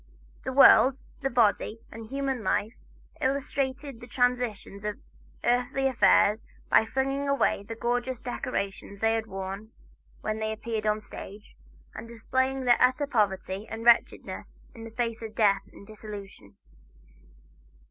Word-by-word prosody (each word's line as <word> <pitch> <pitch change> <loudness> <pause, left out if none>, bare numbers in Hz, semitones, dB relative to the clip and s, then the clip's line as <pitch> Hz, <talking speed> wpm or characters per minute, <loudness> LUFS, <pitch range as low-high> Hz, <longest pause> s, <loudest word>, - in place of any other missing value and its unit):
The - - -3
World, 270 0 +7 0.2
the 270 - 0
Body 225 -2 +2
and 225 0 -9
Human 270 -1 -2
Life 205 +4 0 0.5
illustrated 275 -1 -2
the 240 - -10
transitoriness 245 -6 -1
of 210 0 -3 0.5
earthly 245 +2 +1
affairs 225 -4 +4 0.3
by 220 - +6
flinging 270 +3 -1
away 280 -6 +2
the 225 +3 -7
gorgeous 245 +2 -1
decorations 200 -5 -4
they 225 +1 +2
had 225 -1 -2
worn 195 +2 -6 0.5
when 215 0 -2
they 220 0 -1
appeared 220 0 -3
on 210 - +3
the - - -10
stage, 205 0 -10 0.4
and - - -8
displaying 260 +3 -1
their 240 -1 +4
utter 255 +3 +3
poverty 205 -5 -1
and 225 +1 -6
wretchedness 235 -1 +2
in 225 -1 -10
the - - -7
face 230 0 -3
of 220 -1 -7
death 200 -3 +2
and - - -14
dissolution. 200 - -10
230 Hz, 140 wpm, -28 LUFS, 210-255 Hz, 0.5 s, World